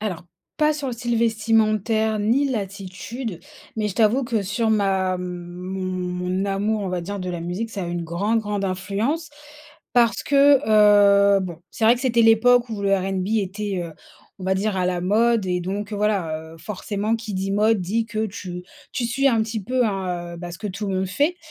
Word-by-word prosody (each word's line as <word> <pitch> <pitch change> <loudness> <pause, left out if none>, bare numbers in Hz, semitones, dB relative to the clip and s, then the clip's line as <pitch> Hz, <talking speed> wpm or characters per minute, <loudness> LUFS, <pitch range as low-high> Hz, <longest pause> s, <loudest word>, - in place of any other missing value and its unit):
Alors, 185 -5 -4 0.3
pas 305 0 +3
sur 295 -2 -4
le - - -3
style 240 0 -2
vestimentaire, 220 -1 +2
ni 240 +7 +2
l'attitude. 200 -1 -5 0.4
Mais 215 -1 0
je 190 - -6
t'avoue 230 +4 +3
que 230 -3 -1
sur 215 +3 0
ma 190 -3 +1
mon 180 +1 -6
mon 180 -1 -3
mon 190 +2 0
amour, 205 +2 0
on 195 - -2
va 180 -1 -2
dire, 200 +4 -5
de 185 0 -4
la 175 -1 -4
musique, 180 +7 -4
ça 200 -4 -4
a - - -4
une 175 0 -3
grande, 200 +7 0
grande 205 -2 -3
influence, 205 - -2 0.6
parce 235 -2 +3
que, 280 -1 +5
heu 205 -2 +6
bon, 175 -4 -5
c'est 225 - -2
vrai 230 +2 +7
que 245 - -7
c'était 235 -3 +3
l'époque 235 +2 +5
où 210 -2 -4
le 195 0 +3
R&B 190 0 -2
était, 200 -1 -3
heu, 165 - -8 0.5
on 185 - -8
va 190 0 +1
dire, 200 +1 -1
à 185 - +1
la 180 -1 -1
mode. 220 +2 +2
Et 180 -1 0
donc, 200 +4 -4
heu, - - -2
voilà, 165 -7 -1
heu, - - -13
forcément, 205 +5 -2
qui 220 -2 -7
dit 190 +1 -2
mode 215 +1 +3
dit 215 +6 -1
que 220 0 -2
tu 185 -3 -7 0.3
tu 240 -3 -1
suis 275 +4 +1
un 230 -4 +2
petit 220 -1 -4
peu, 250 +2 +1
hein, 180 -4 -3
heu, - - -9
bah, 175 0 -6
ce 170 - -8
que 215 - -5
tout 200 +2 -5
le 190 - -1
monde 190 0 0
fait. 295 - +1
205 Hz, 210 wpm, -23 LUFS, 185-225 Hz, 0.6 s, vrai